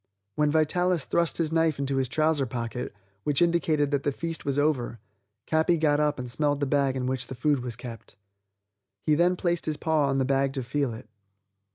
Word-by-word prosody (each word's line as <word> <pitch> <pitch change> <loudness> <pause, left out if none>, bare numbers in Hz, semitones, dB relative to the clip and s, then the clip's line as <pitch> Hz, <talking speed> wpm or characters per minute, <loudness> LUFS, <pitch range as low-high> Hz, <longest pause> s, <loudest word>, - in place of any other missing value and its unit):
When 150 +4 +2
Vitalis 160 +2 +2
thrust 170 -1 0
his 160 -2 0
knife 160 -2 +2
into 135 -1 -1
his 130 -2 0
trouser 155 -1 +1
pocket, 120 +1 -4 0.3
which 145 -2 +1
indicated 160 -4 +2
that 140 -1 +1
the 145 - 0
feast 165 +3 -5
was 140 -1 -1
over, 145 -5 +1 0.5
Capi 160 +2 +2
got 150 -2 +2
up 150 -1 +1
and 125 -1 -5
smelled 145 +3 0
the 145 - +1
bag 140 -1 +1
in 125 - -2
which 130 -1 -1
the 130 - -7
food 145 +3 +1
was 120 -2 -4
kept. 115 -2 -10 0.9
He 155 - +3
then 175 +4 +3
placed 175 -2 -1
his 155 -1 -1
paw 155 -3 +1
on 135 0 0
the 135 - +2
bag 135 0 +1
to 135 -2 -3
feel 135 +1 -1
it. 110 - -11
145 Hz, 205 wpm, -27 LUFS, 130-160 Hz, 0.9 s, He